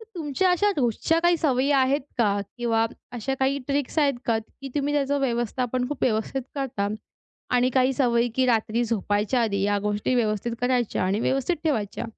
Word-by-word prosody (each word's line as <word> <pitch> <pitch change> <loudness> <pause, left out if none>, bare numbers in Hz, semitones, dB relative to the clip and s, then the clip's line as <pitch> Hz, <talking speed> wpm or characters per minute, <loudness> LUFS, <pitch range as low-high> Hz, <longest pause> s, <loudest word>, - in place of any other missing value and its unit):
तर - - -11
तुमच्या 335 +2 0
अशा 385 +4 +3
रोजच्या 265 +5 +1
काही 345 0 +4
सवयी 275 -3 +1
आहेत 275 +1 +3 0.2
का? 205 -3 +2 0.2
किंवा 230 -1 +1 0.3
अशा 250 +3 -2
काही 270 +1 +2
ट्रिक्स 285 +1 -1
आहेत 285 -2 +3
का? 225 -1 +1
की 270 +5 -10
तुम्ही 290 0 0
त्याचं 285 0 +1
व्यवस्थापन 250 0 -1
खूप 295 - -6
व्यवस्थित 225 +3 0
करता, 240 -8 -2 0.7
आणि 250 +1 +3
काही 260 +1 +3
सवयी 245 -2 +2
की 260 0 +2
रात्री 230 0 +1
झोपायच्या 215 +2 0
आधी 200 -4 0
या 205 0 +2
गोष्टी 210 +4 -1
व्यवस्थित 225 -1 0
करायच्या 245 -4 0
आणि 195 +3 0
व्यवस्थित 270 +8 0
ठेवायच्या. 230 -9 -1
250 Hz, 170 wpm, -25 LUFS, 225-275 Hz, 0.7 s, काही